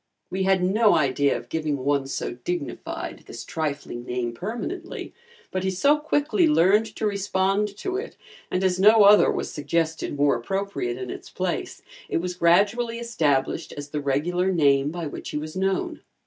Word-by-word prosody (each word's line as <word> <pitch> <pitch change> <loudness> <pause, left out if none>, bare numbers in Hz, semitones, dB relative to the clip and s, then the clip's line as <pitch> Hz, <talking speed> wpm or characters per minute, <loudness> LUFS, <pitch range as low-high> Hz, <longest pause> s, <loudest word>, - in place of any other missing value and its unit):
We 190 - -2
had 190 -1 +3
no 205 +2 +4
idea 140 -2 +2
of - - -10
giving 155 -3 -1
one 140 +1 0
so - - -3
dignified 145 +6 -5
this - - -8
trifling 145 -6 -4
name 125 -1 -3
permanently, 240 - -5 0.4
but 185 0 -2
he 190 - +1
so 280 +11 +3
quickly 310 +3 +2
learned 210 - +4
to - - -2
respond 200 0 0
to 375 - -3
it, 415 - -6 0.3
and 185 - -1
as 185 -1 +1
no 215 +2 +7
other 205 +1 +7
was - - -3
suggested 160 0 -2
more 145 -1 +3
appropriate 160 -2 -3
in 130 -1 -5
its - - -9
place, - - -3 0.3
it - - 0
was 180 +2 -2
gradually 205 +7 +2
established 160 - 0
as 145 0 -6
the 150 0 -3
regular 175 +7 0
name 140 -5 +3
by 170 +1 -5
which 145 - -6
he - - -3
was 155 +2 -6
known. 190 0 -1
180 Hz, 170 wpm, -24 LUFS, 145-205 Hz, 0.4 s, no